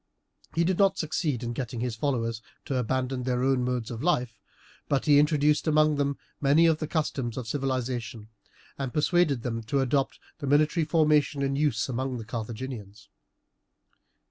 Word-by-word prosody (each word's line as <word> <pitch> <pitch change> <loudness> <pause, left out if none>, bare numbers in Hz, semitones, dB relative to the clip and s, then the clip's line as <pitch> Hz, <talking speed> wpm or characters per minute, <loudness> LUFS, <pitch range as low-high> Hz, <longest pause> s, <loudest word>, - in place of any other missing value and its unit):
He 170 - +3
did 180 +1 0
not 195 -1 +4
succeed 150 -6 -1
in 120 0 -3
getting 120 -1 -4
his 120 -1 -2
followers 115 -3 -1 0.2
to 140 - -2
abandon 130 +1 -1
their 125 0 -1
own 130 -1 +2
modes 125 -2 -2
of 115 -1 -5
life, 125 -9 0 0.5
but 140 -2 +1
he 145 -2 +6
introduced 150 +1 +2
among 155 -1 +3
them 140 -1 0 0.2
many 145 +4 +5
of 160 -2 +3
the 155 - -3
customs 135 -7 -2
of 125 -3 -4
civilization, 125 -4 -3 0.5
and 135 -3 -4
persuaded 150 -5 +2
them 115 -2 -2
to 140 +5 0
adopt 135 +1 0 0.2
the 140 - -4
military 155 +3 +3
formation 150 -3 +2
in 135 0 0
use 140 -6 +1
among 130 0 -2
the 115 - -7
Carthaginians. 110 -2 -7
135 Hz, 165 wpm, -27 LUFS, 120-150 Hz, 0.5 s, he